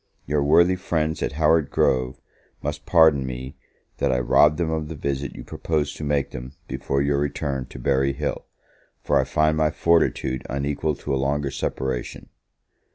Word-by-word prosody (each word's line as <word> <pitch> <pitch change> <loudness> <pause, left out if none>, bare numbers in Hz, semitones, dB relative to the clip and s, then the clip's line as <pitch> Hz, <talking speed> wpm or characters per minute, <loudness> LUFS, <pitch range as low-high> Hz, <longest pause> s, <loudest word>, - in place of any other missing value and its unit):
Your 75 +1 0
worthy 85 +5 +5
friends 80 -4 -1
at - - -1
Howard 80 0 +3
Grove 65 0 +1 0.4
must 75 +1 -4
pardon 80 -5 +5
me 65 0 -6 0.4
that - - +2
I 60 - +1
rob 75 +4 +4
them 85 -2 -1
of 80 -1 -2
the 80 - -6
visit 70 -1 -3
you - - -8
proposed 75 -3 -2
to - - -6
make 70 -2 0
them 65 +1 -8
before 70 0 -1
your 70 0 +1
return 70 -2 -2
to - - -11
Berry 70 +2 +1
Hill, 70 +1 -4 0.6
for - - +2
I - - +1
find 75 0 +1
my 80 -1 +3
fortitude 80 -5 +1
unequal 70 +2 -1
to 70 - -4
a 65 - 0
longer 70 0 -1
separation. 65 -2 -4
70 Hz, 170 wpm, -23 LUFS, 65-75 Hz, 0.6 s, worthy